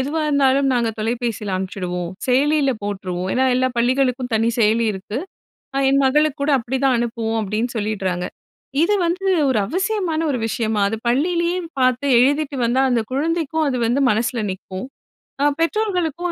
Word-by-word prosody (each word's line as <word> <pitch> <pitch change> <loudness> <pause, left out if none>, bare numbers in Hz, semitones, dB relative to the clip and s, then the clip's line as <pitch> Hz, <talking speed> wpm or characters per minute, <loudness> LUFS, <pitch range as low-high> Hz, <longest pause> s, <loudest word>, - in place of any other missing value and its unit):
எதுவா 290 +5 -1
இருந்தாலும் 275 -1 +3
நாங்க 240 -2 +1
தொலைபேசில 225 -3 -2
அனுப்பிச்சுடுவோம், 180 -2 -4 0.2
செயலியில 280 +2 +3
போட்ருவோம். 190 -3 -3
ஏன்னா 260 - +2
எல்லா 255 +1 +2
பள்ளிகளுக்கும் 250 +1 +1
தனி 225 +1 +2
செயலி 225 +1 +3
இருக்கு. 205 +4 -5 0.6
அ - - +2
என் 275 0 +3
மகளுக்கு 300 +2 +2
கூட 290 - +1
அப்படிதான் 260 +2 0
அனுப்புவோம், 225 -1 -2
அப்படின்னு 215 +4 -2
சொல்லிட்றாங்க. 190 -4 -2 0.6
இது 395 +5 +3
வந்து 365 +3 -2 0.2
ஒரு 250 - +2
அவசியமான 370 - -1
ஒரு 260 - -1
விஷயமா? 220 -1 -1
அது 225 - -2
பள்ளியிலேயே 340 +7 +1 0.2
பார்த்து 255 +2 +2
எழுதிட்டு 285 +3 +2
வந்தா 240 +3 +2
அந்த 240 -2 +2
குழந்தைக்கும் 320 +2 0
அது 260 - -1
வந்து 245 +4 +1
மனசுல 225 +2 0
நிக்கும். 190 +3 -7 0.6
அ - - +4
பெற்றோர்களுக்கும் 350 -2 0
255 Hz, 145 wpm, -20 LUFS, 220-300 Hz, 0.6 s, அ